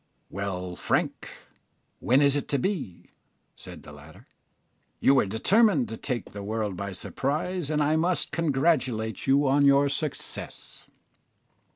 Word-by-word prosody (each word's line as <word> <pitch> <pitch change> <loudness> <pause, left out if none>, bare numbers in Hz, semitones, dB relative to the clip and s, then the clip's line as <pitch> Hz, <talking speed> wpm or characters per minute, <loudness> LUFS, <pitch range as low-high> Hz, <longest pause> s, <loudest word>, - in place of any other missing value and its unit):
"Well, 90 -2 -4
Frank, - - -1 0.7
when 130 +4 +3
is 140 0 +4
it 145 - -2
to 140 - 0
be?" 135 - -4 0.4
said - - -11
the - - -12
latter. 75 +2 -15 0.7
"You 135 - +4
were 130 -7 +3
determined 145 - +3
to 115 - -5
take 125 -1 -4
the 100 - -7
world 105 -1 -3
by 100 +2 -5
surprise, 150 - -3
and 150 -1 +1
I 150 +2 +2
must 175 +2 0
congratulate 135 -8 0
you 140 +1 +4
on 140 +2 +3
your 140 0 +5
success." 150 +1 -5
135 Hz, 140 wpm, -26 LUFS, 105-150 Hz, 0.7 s, your